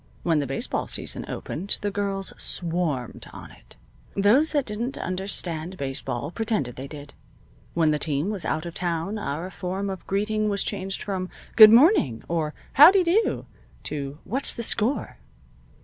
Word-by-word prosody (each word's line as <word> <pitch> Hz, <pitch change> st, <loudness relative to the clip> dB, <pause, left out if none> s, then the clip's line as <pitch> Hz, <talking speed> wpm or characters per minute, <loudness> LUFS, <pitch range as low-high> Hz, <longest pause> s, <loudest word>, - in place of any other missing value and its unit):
When 165 Hz, -3 st, +2 dB
the 140 Hz, -, -2 dB
baseball 135 Hz, -, -2 dB
season -, -, -4 dB
opened 190 Hz, +6 st, -4 dB
the 205 Hz, -, -1 dB
girls 195 Hz, -1 st, -2 dB
swarmed 165 Hz, -8 st, -1 dB
on -, -, -10 dB
it. -, -, -16 dB, 0.4 s
Those 225 Hz, +11 st, +4 dB
that 290 Hz, -3 st, +1 dB
didn't 235 Hz, +5 st, -3 dB
understand 185 Hz, -2 st, -3 dB
baseball 135 Hz, 0 st, -4 dB
pretended 210 Hz, -, -2 dB
they 135 Hz, +2 st, -7 dB
did. 145 Hz, 0 st, -10 dB, 0.6 s
When 160 Hz, -2 st, +3 dB
the 150 Hz, -, 0 dB
team 150 Hz, +6 st, -1 dB
was 200 Hz, -4 st, -3 dB
out 155 Hz, +2 st, -2 dB
of 170 Hz, -, -6 dB
town 175 Hz, +4 st, -2 dB
our 170 Hz, +1 st, -4 dB
form 190 Hz, +2 st, -3 dB
of 190 Hz, -, -8 dB
greeting 210 Hz, +2 st, 0 dB
was 200 Hz, -1 st, +1 dB
changed 195 Hz, -1 st, -3 dB
from, 185 Hz, -3 st, -3 dB, 0.3 s
"Good 215 Hz, -2 st, +11 dB
morning!" 230 Hz, -, +5 dB
or 160 Hz, -2 st, -2 dB, 0.2 s
"Howdy 360 Hz, +7 st, +8 dB
do!" 370 Hz, +6 st, +1 dB, 0.4 s
to 140 Hz, -1 st, -5 dB
"What's 265 Hz, +6 st, 0 dB
the 235 Hz, -, -4 dB
score?" 230 Hz, +4 st, -1 dB
190 Hz, 155 wpm, -25 LUFS, 155-215 Hz, 0.6 s, Good